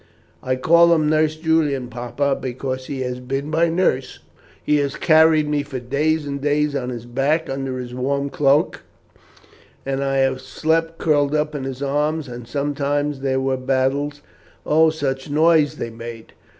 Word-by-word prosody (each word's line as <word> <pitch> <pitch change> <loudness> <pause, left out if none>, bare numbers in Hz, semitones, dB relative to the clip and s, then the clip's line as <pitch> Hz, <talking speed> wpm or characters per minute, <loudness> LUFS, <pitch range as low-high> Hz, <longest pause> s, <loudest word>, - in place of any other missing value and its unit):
I 130 0 -1
call 170 +6 +5
him 155 -2 +1
Nurse 155 0 +2
Julian, 155 -5 0
papa, 125 +3 -2
because 130 0 -4
he 135 -2 -4
has 125 -1 -3
been 135 +4 -4
my 165 +2 +3
nurse. 165 -7 0 0.5
He 150 - +2
has 140 -1 -1
carried 155 -1 +4
me 150 -1 0
for 140 -2 -6
days 145 +5 0
and 140 -1 -4
days 150 0 +1
on 125 -3 -2
his 120 -2 -6
back 140 +7 0
under 135 -1 -3
his 125 -1 -6
warm 140 +2 -1
cloak, 145 +1 +2 1.0
and 135 0 -1
I 135 0 0
have 135 -1 +1
slept 165 +5 -1
curled 145 -2 +2
up 150 0 0
in 140 -3 -4
his 135 +1 -5
arms; 150 +2 -1
and 120 -1 -8
sometimes 145 +1 -1
there 135 -1 0
were 130 0 0
battles. 135 +3 -1 0.4
Oh, 160 +1 +4
such 135 -4 -3
a - - -8
noise 155 -1 +4
they 115 - -5
made! 115 0 -9
140 Hz, 170 wpm, -21 LUFS, 130-150 Hz, 1.0 s, call